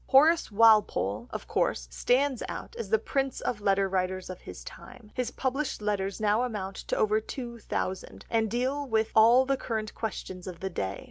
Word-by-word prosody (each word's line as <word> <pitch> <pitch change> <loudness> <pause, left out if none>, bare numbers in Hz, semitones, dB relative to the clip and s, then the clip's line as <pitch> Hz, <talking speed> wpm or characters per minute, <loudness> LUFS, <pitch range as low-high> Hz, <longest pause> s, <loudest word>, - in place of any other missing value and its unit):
Horace 310 +1 +5
Walpole, 205 - +4
of - - -6
course, - - 0
stands 255 - +1
out - - -7
as 220 -4 -5
the 220 - +4
prince 270 +4 -2
of 210 -4 -3
letter 195 -1 +2
writers 185 0 -2
of 185 - -9
his - - -9
time; 215 -3 -12
his 250 -2 -1
published 270 +3 -2
letters 200 -2 -2
now 215 +1 +2
amount 205 -6 -3
to - - 0
over 215 0 +2
two 235 0 -7
thousand, 190 -3 -4
and 225 -1 +1
deal 265 +5 -1
with 220 -2 +1
all 235 +4 +7
the 275 0 +1
current 220 -4 -3
questions 190 -4 -5
of 180 -2 -7
the 190 0 -4
day. 95 - -3
220 Hz, 185 wpm, -28 LUFS, 195-250 Hz, -, all